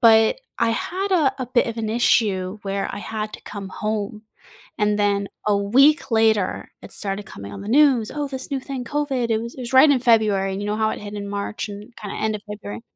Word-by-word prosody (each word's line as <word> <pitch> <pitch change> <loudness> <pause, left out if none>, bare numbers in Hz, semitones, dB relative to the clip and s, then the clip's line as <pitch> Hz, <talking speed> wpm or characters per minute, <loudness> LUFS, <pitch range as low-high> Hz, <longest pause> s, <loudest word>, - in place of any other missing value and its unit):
but 225 - +5 0.2
I 230 0 +2
had 380 - -2
a 315 -7 +3
a - - -4
bit 250 0 +2
of 230 - -5
an 220 -1 -2
issue 210 -4 +2
where 195 0 -2
I - - -5
had 215 0 -4
to - - -9
come 200 -2 -7
home, 215 0 -3 0.6
and 210 0 +2
then 200 -1 +1 0.2
a 205 -1 +3
week 265 +7 +4
later, 220 -4 +2
it - - -7
started 200 0 -2
coming 100 - -9
on - - -7
the 200 - -7
news, 260 -3 +4
"Oh, 290 -1 -2
this 265 0 -6
new 275 -2 -1
thing, 260 -2 -5
COVID," 270 -4 -1
it 220 - +2
was 235 +1 -6
it 260 - -9
was 245 +1 -5
right 285 +3 +8
in 265 -3 +3
February, 210 -5 +3
and 195 - -4
you 205 - -3
know 210 - -1
how 220 0 +1
it - - -5
hit 205 0 -7
in 200 -1 -5
March 200 +1 -4
and 205 +3 -10
kinda 205 -2 -7
end 220 0 -1
of 205 - -13
February. 210 +1 -7
220 Hz, 235 wpm, -22 LUFS, 205-250 Hz, 0.6 s, right